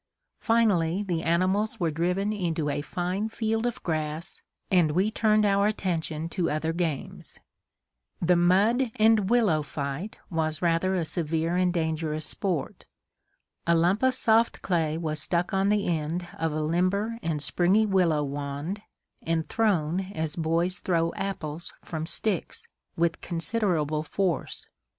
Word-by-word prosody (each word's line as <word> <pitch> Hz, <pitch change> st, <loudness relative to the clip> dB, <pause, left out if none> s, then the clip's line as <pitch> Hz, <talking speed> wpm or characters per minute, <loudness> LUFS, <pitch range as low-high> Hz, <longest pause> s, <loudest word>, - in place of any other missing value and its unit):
Finally 200 Hz, -6 st, +2 dB
the 175 Hz, -5 st, -1 dB
animals 190 Hz, +7 st, +1 dB
were 170 Hz, -3 st, +1 dB
driven 180 Hz, +6 st, 0 dB
into 165 Hz, -7 st, -1 dB
a 145 Hz, -, -2 dB
fine 185 Hz, +6 st, -2 dB
field 225 Hz, +1 st, -1 dB
of 240 Hz, -, -5 dB
grass 155 Hz, +2 st, -3 dB, 0.3 s
and 175 Hz, -4 st, +4 dB
we 190 Hz, +6 st, +2 dB
turned 215 Hz, -1 st, +3 dB
our 200 Hz, 0 st, +3 dB
attention 165 Hz, -6 st, -2 dB
to 175 Hz, 0 st, -1 dB
other 160 Hz, +2 st, -1 dB
games. 165 Hz, -5 st, -4 dB, 0.8 s
The 175 Hz, +1 st, +3 dB
"mud 205 Hz, +9 st, +3 dB
and 220 Hz, -3 st, +4 dB
willow" 215 Hz, -11 st, +3 dB
fight 145 Hz, +7 st, -5 dB
was 155 Hz, -2 st, -1 dB
rather 175 Hz, +2 st, +1 dB
a 175 Hz, -3 st, 0 dB
severe 165 Hz, +1 st, -1 dB
and 180 Hz, 0 st, +2 dB
dangerous 160 Hz, -2 st, -1 dB
sport. 175 Hz, -3 st, -2 dB, 0.8 s
A 170 Hz, -, +5 dB
lump 175 Hz, +5 st, +2 dB
of 260 Hz, 0 st, +3 dB
soft 230 Hz, -2 st, +2 dB
clay 160 Hz, -4 st, 0 dB
was 155 Hz, -2 st, -2 dB
stuck 175 Hz, +5 st, -1 dB
on 195 Hz, +1 st, +2 dB
the 210 Hz, -1 st, +2 dB
end 170 Hz, +1 st, -1 dB
of 165 Hz, -1 st, -1 dB
a 155 Hz, +1 st, -1 dB
limber 190 Hz, +8 st, 0 dB
and 160 Hz, -5 st, -1 dB
springy 180 Hz, +8 st, +3 dB
willow 175 Hz, -7 st, +2 dB
wand 145 Hz, +7 st, -4 dB, 0.4 s
and 165 Hz, -1 st, -1 dB
thrown 185 Hz, -7 st, +1 dB, 0.2 s
as 160 Hz, -1 st, -2 dB
boys 170 Hz, +2 st, 0 dB
throw 165 Hz, -2 st, 0 dB
apples 170 Hz, -4 st, -4 dB
from 160 Hz, -1 st, -4 dB
sticks, 195 Hz, +1 st, -2 dB, 0.3 s
with 170 Hz, 0 st, +1 dB
considerable 165 Hz, -4 st, 0 dB
force. 170 Hz, +1 st, -2 dB
175 Hz, 140 wpm, -27 LUFS, 160-200 Hz, 0.8 s, A